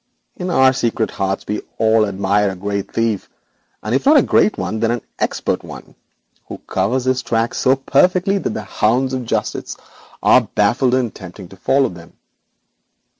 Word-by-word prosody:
In 180 -3 -4
our 130 -5 +4
secret 115 -3 -1
hearts 95 0 -2
we 105 - -2 0.2
all 110 -1 +3
admire 100 +1 +1
a 95 - -5
great 100 +1 -4
thief, 115 -3 -1 0.5
and 110 - -2
if 135 - +1
not 300 +1 +7
a 275 - +5
great 215 - +2
one, 110 - -3
then 115 0 +1
an 120 -1 -2 0.2
expert - - -1
one, - - -11 0.5
who - - -7
covers 130 +1 -1
his 130 0 +1
tracks 115 0 -1
so 130 +1 +3
perfectly 180 +8 +2
that - - -2
the 110 - -4
hounds 120 +6 0
of 130 -2 -3
justice - - -3 0.5
are - - +6
baffled 130 0 +2
in 130 -1 +1
attempting 95 -4 -10
to - - -13
follow 135 +8 +1
them. 85 -2 -13
115 Hz, 175 wpm, -18 LUFS, 100-130 Hz, 0.5 s, not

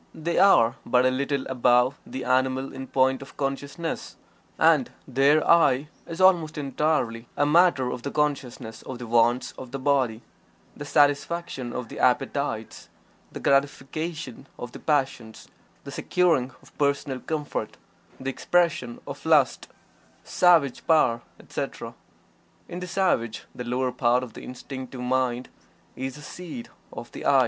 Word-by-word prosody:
They 170 +2 -1
are 130 -11 +5
but 125 0 +3
a 130 - +4
little 140 +1 -1
above 125 +1 +2
the 130 - -6
animal 130 +1 +1
in 130 0 -7
point 130 0 +2
of 135 - -12
consciousness, 140 +4 -4 0.4
and - - +4 0.2
their 140 +4 +3
"I" 150 -4 +4 0.2
is 165 +1 -7
almost 175 -5 +4
entirely 135 -5 -1
a 145 - +3
matter 150 -5 +4
of 125 - -5
the 140 - -4
consciousness 130 -6 -2
of 130 - -7
the 120 - -7
wants 120 +2 +2
of 130 - -8
the 135 - -5
body; 130 -5 +1 0.5
the 145 - -7
satisfaction 145 -2 +1
of 125 -1 -5
the - - -9
appetites; 125 -2 -1 0.4
the - - -7
gratification 140 0 -1
of 125 - -7
the - - -10
passions; 130 -7 -2 0.3
the - - -8
securing 165 -8 +1
of - - -20
personal 140 -2 0
comfort; 150 0 -4 0.4
the 135 0 -3
expression 165 -7 0
of - - -8
lust, - - +3 0.6
savage 165 -7 +3
power, 130 -8 +4 0.2
etc. - - -5 0.7
In 175 - -6
the 180 - -6
savage 170 - 0
the 125 - -6
lower 125 +1 -1
part 125 0 +2
of 120 -3 -8
the - - -9
Instinctive 130 0 -8
Mind 125 0 0 0.5
is 130 0 -4
the 150 - -11
seat 180 +10 -8 0.2
of - - -9
the - - -8
"I." - - +5
135 Hz, 145 wpm, -25 LUFS, 125-150 Hz, 0.7 s, are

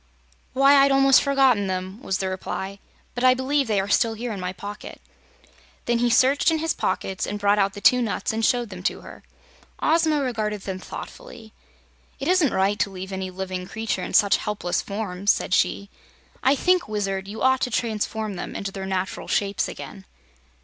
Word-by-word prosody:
"Why, 275 +2 +6
I'd 275 0 +5
almost 270 0 +6
forgotten 265 -7 +3
them," 185 +3 -4
was 190 -8 -1
the 190 - -2
reply; 190 +1 -5 0.3
"but 245 - -4
I 255 0 +6
believe 270 +1 0
they 210 -3 +1
are 195 - -2
still 225 +2 +2
here 235 +2 -4
in 200 - -6
my 180 0 -3
pocket." 205 +2 -9 0.9
Then 235 0 +1
he 240 0 +2
searched 265 +6 +4
in 325 - +1
his 325 +1 -1
pockets 190 -1 -2
and 205 - -3
brought 205 0 +2
out 195 0 +2
the 205 - -9
two 250 +3 +5
nuts 230 +1 -2
and 225 +1 -2
showed 240 -1 +1
them 185 -1 -8
to - - -2
her. - - -12 0.6
Ozma 315 -1 +2
regarded 215 -5 -2
them 190 -1 -5
thoughtfully. 230 - -10 0.7
"It 270 - -4
isn't 360 -6 +3
right 195 +2 +1
to - - +1
leave 190 0 -8
any 190 -1 -4
living 185 0 -5
creatures 220 +2 -3
in - - -9
such 200 -1 +5
helpless 200 -4 -2
forms," 200 -1 -1
said - - -2
she. 200 +1 +1 0.5
"I 270 +2 +4
think, 365 +4 +2
Wizard, 195 -2 -2
you 215 +2 -6
ought 260 0 +3
to - - 0
transform 220 -3 -2
them - - -6
into 200 -1 -4
their 190 0 -6
natural 190 0 -3
shapes 200 0 0
again." 195 -2 -9
210 Hz, 190 wpm, -24 LUFS, 195-255 Hz, 0.9 s, Why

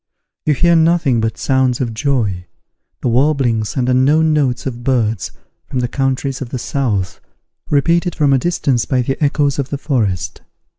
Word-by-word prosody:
You 150 - +3
hear 170 +3 +3
nothing 160 -7 +3
but 110 0 -2
sounds 130 -2 +1
of 120 -3 -2
joy, 110 -9 -1 0.5
the - - -1
warblings 125 -4 +1
and 125 -1 0
unknown 145 +5 +3
notes 130 -5 0
of 120 -2 -5
birds 115 -6 0 0.4
from - - -5
the 125 -1 0
countries 135 +1 -2
of 130 - -5
the 130 - -4
south, 110 -9 -2 0.5
repeated 170 +5 +1
from 145 -3 +2
a 135 - +3
distance 140 -7 0
by 130 -2 0
the 135 +5 -2
echoes 145 -1 +1
of 140 -1 -2
the 145 - -3
forest. 115 - -2
130 Hz, 165 wpm, -17 LUFS, 120-145 Hz, 0.5 s, You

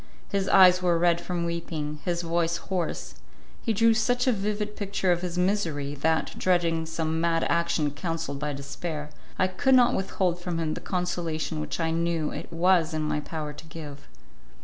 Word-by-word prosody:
His 195 -1 0
eyes 185 -2 +7
were 175 -2 +3
red 170 0 +3
from 175 -2 -2
weeping, 160 -3 -4
his 175 -1 -1
voice 170 0 0
hoarse; 180 -3 -3 0.5
he 230 - 0
drew 225 +2 +4
such 245 +2 +1
a 255 - +4
vivid 210 0 -2
picture 195 -2 0
of 175 0 +1
his 180 -1 -4
misery, 170 -7 0
that, 160 +3 0
dreading 170 -3 +1
some 160 0 -1
mad 165 -1 +2
action 170 -3 +1
counselled 155 -2 -4
by 150 0 -2
despair, 145 +2 -5 0.3
I - - +3
could 260 +9 +3
not 245 -1 +5
withhold 185 -2 0
from 175 -2 -3
him 160 -2 -1
the - - -6
consolation 170 -3 -2
which 155 - -4
I 165 -1 0
knew 165 -1 0
it - - -7
was 170 -1 +3
in 155 - -1
my 150 0 0
power 150 0 -5
to 150 - -12
give. 150 -3 -9
170 Hz, 180 wpm, -27 LUFS, 160-185 Hz, 0.5 s, eyes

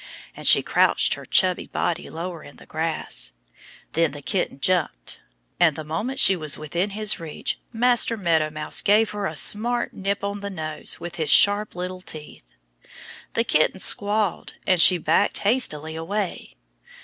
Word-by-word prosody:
And - - -2
she - - +7
crouched - - +2
her - - -7
chubby 185 -2 +3
body 170 - -3
lower 170 -1 -7
in 145 - -14
the - - -16
grass. 160 - -4 0.6
Then 165 -3 0
the 145 -1 -10
kitten 180 -6 -2
jumped. 155 - -1 0.4
And 165 -4 +4
the 155 - -6
moment 185 - -4
she 195 - +5
was 155 -4 -2
within 170 +6 -3
his 215 -2 0
reach 160 -3 -5
Master 240 0 +2
Meadow 165 -5 +1
Mouse 155 0 -1
gave 215 +2 +3
her 205 -1 -3
a - - -6
smart 240 +3 +3
nip 200 +1 -3
on 200 0 -3
the 200 0 -6
nose 155 -5 -5
with 175 0 -8
his 155 -3 -2
sharp 205 +4 +4
little 180 +1 -6
teeth. 150 - -10 0.8
The 230 - +2
kitten 190 -3 +1
squalled. 205 0 +1
And 180 -3 +3
she 180 - +7
backed 165 +5 +1
hastily 160 - -1
away. 190 +4 -4
180 Hz, 160 wpm, -23 LUFS, 155-205 Hz, 0.8 s, she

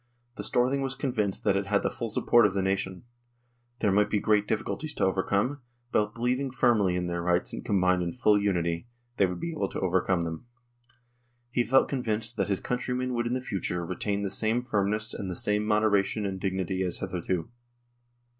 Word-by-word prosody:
The - - -6
Storthing 130 +3 +1
was 135 0 -2
convinced 125 -8 -1
that 100 -2 +3
it 100 0 -1
had 100 0 +2
the - - 0
full 115 - -4
support 115 +1 +4
of 100 - -5
the 95 - +1
nation. 95 0 -1 0.8
There 100 - +3
might 105 +2 +3
be 105 - +1
great 105 0 +2
difficulties 150 +7 -2
to - - +1
overcome, 100 +8 0 0.3
but, 105 0 +1
believing 125 +3 0
firmly 110 -7 +2
in 90 0 -1
their 85 0 -2
rights 90 0 0
and - - -5
combined 90 -2 +2
in 85 -1 -1
full 105 -3 +3
unity, 85 -1 0 0.3
they 100 - +4
would 90 - -5
be 170 - -3
able 155 - -2
to - - -4
overcome 95 -1 +1
them. 80 +7 -5 1.0
He 120 -1 +2
felt 135 +2 +4
convinced 115 -3 -1
that 100 - +1
his 100 - +1
countrymen 125 +1 -2
would 120 0 0
in 120 - -1
the 130 - -2
future 90 -6 -3
retain 100 +3 -2
the 100 - -2
same 110 +4 +1
firm 100 -5 0
ness 110 +1 -1
and 95 - -4
the 90 - -4
same 105 +4 0
moderation 105 -1 +2
and 95 -1 -3
dignity 95 -1 -1
as 90 -2 -1
hitherto. 90 +2 -3
105 Hz, 200 wpm, -28 LUFS, 95-120 Hz, 1.0 s, support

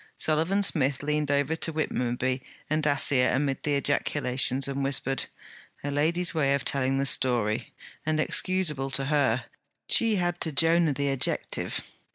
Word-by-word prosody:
Sullivan 165 +6 +2
Smith 140 -6 +2
leaned 150 0 -1
over 145 +2 +1
to 165 - +2
Whitmonby 130 -4 -2 0.3
and 155 0 +1
Dacier 140 -3 +3
amid 135 -1 -1
the 145 -1 -1
ejaculations, 140 -2 0
and 140 0 -3
whispered: 135 0 0 0.6
'A 145 - -3
lady's 165 +4 0
way 140 -4 +1
of 140 - -4
telling 135 -1 +1
the 135 - 0
story! 120 -4 +1 0.3
and 155 0 -1
excuseable 155 -5 0
to 135 +1 0
her: 135 -4 +1 0.4
she 225 -2 +3
had 175 -2 -2
to 160 - +1
Jonah 165 +1 +3
the 140 0 -1
adjective. 135 -2 -1
140 Hz, 150 wpm, -26 LUFS, 135-155 Hz, 0.6 s, Dacier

